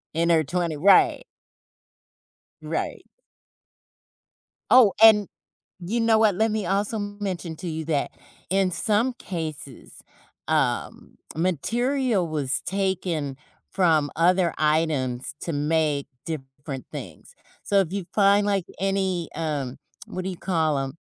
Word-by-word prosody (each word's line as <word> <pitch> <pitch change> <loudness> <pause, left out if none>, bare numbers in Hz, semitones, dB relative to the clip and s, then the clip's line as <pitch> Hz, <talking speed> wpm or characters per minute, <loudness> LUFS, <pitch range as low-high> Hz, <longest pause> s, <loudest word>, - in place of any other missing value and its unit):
In 170 +1 +2
her 160 -1 +4
twentie 170 +1 -2
right. 195 - +5 1.4
Right. - - -4 1.7
Oh, 240 -6 +7
and 215 -3 +7 0.5
you 210 +7 -2
know 225 -1 +4
what, 215 -3 +4
let 220 +4 +1
me 215 -3 -2
also 200 +4 0
mention 200 -5 -4
to 175 - -6
you 160 0 -4
that 150 -3 0 0.4
in 190 0 +2
some 215 +8 +1
cases, 155 - -7 0.5
um, - - -1 0.2
material 225 - 0
was 145 -4 -2
taken 180 -7 -2 0.3
from 160 -6 +2
other 175 +1 +3
items 150 -6 0
to 170 - -3
make 150 -1 0 0.2
different 135 -3 -7
things. - - -9 0.3
So 200 -1 +2
if 185 -3 -2
you 200 -2 -3
find 200 0 +4
like 200 -3 +1 0.2
any, 190 -3 0
um, 145 -6 -3 0.3
what 185 - -6
do 190 - -2
you 180 - -6
call 160 -5 0
'em? 135 0 -4
175 Hz, 120 wpm, -24 LUFS, 155-200 Hz, 1.7 s, Oh